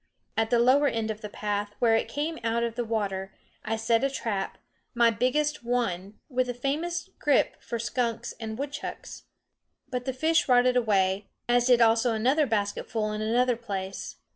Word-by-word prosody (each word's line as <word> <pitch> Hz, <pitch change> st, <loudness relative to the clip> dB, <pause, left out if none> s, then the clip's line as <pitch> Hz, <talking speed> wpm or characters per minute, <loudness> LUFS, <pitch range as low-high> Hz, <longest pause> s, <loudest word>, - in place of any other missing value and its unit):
At 225 Hz, 0 st, +1 dB
the 240 Hz, -, +3 dB
lower 260 Hz, +5 st, +5 dB
end 225 Hz, -4 st, -1 dB
of 215 Hz, 0 st, -7 dB
the 210 Hz, -, -6 dB
path, 205 Hz, 0 st, -3 dB
where 230 Hz, -2 st, +4 dB
it 225 Hz, -, +1 dB
came 310 Hz, +3 st, -3 dB
out 230 Hz, +1 st, +1 dB
of 235 Hz, -1 st, -1 dB
the 240 Hz, -, -2 dB
water, 195 Hz, -4 st, -2 dB, 0.3 s
I 225 Hz, -, -1 dB
set 225 Hz, +2 st, +1 dB
a 275 Hz, -, +3 dB
trap, 210 Hz, -7 st, -3 dB, 0.4 s
my 235 Hz, -1 st, +5 dB
biggest 290 Hz, +6 st, 0 dB
one, 210 Hz, -5 st, -2 dB
with 255 Hz, -2 st, 0 dB
a 245 Hz, -, -3 dB
famous 330 Hz, +9 st, -2 dB
grip 290 Hz, -2 st, +2 dB
for 235 Hz, -, -4 dB
skunks 235 Hz, 0 st, -2 dB
and 220 Hz, -1 st, -5 dB
woodchucks. 280 Hz, +1 st, -6 dB, 0.7 s
But 250 Hz, -1 st, -3 dB
the 265 Hz, -, -1 dB
fish 320 Hz, +4 st, +2 dB
rotted 250 Hz, 0 st, +5 dB
away, 200 Hz, -4 st, +2 dB, 0.2 s
as 245 Hz, 0 st, +3 dB
did 245 Hz, -2 st, +5 dB
also 230 Hz, +1 st, +4 dB
another 265 Hz, +7 st, +2 dB
basketful 215 Hz, 0 st, -1 dB
in 210 Hz, 0 st, -3 dB
another 245 Hz, +3 st, +2 dB
place. 195 Hz, -4 st, -5 dB
235 Hz, 175 wpm, -27 LUFS, 215-255 Hz, 0.7 s, lower